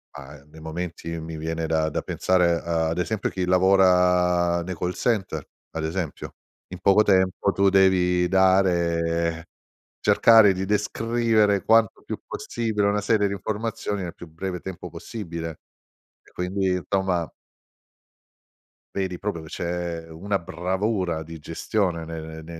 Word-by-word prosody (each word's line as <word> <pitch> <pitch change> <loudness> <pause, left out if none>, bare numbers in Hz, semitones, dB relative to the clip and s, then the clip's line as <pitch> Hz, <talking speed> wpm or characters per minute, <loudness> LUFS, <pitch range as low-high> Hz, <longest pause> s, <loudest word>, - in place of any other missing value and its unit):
Ah 70 +1 -10
nei 80 - -13
momenti 85 0 -5
mi 80 0 -7
viene 80 +1 -3
da 80 -1 +1
da - - -2
pensare 90 -2 +1
ad 85 0 -1
esempio 105 +3 -1
chi 95 -1 -2
lavora 90 -2 +3
nei 90 +2 -5
call 90 +2 -2
center, 95 - -1 0.3
ad 80 - -4
esempio. 80 0 -4 0.3
In 90 - -8
poco 100 +2 +5
tempo 95 -1 +2
tu 100 0 +3
devi 90 -2 +3
dare 85 -3 +2 0.6
cercare 105 -1 +6
di 95 - -3
descrivere 105 0 +1
quanto 115 -1 +3
più - - -4
possibile 110 -3 -2
una 105 0 0
serie 105 -1 +2
di 100 - -2
informazioni 105 0 -3
nel 85 -2 -6
più 85 - -11
breve 90 +3 -5
tempo 95 -2 -7
possibile. 85 -7 -7 0.6
E - - -23
quindi 95 +1 -1
insomma 90 -2 -1 1.7
vedi 95 -2 -2
proprio 100 -5 -4
che 80 - -11
c'è 85 -1 -4
una 95 +5 -2
bravura 90 0 -2
di 80 +1 -10
gestione 85 +2 -2
ne 80 0 -6 0.2
ne 85 0 -9
90 Hz, 135 wpm, -24 LUFS, 85-100 Hz, 1.7 s, cercare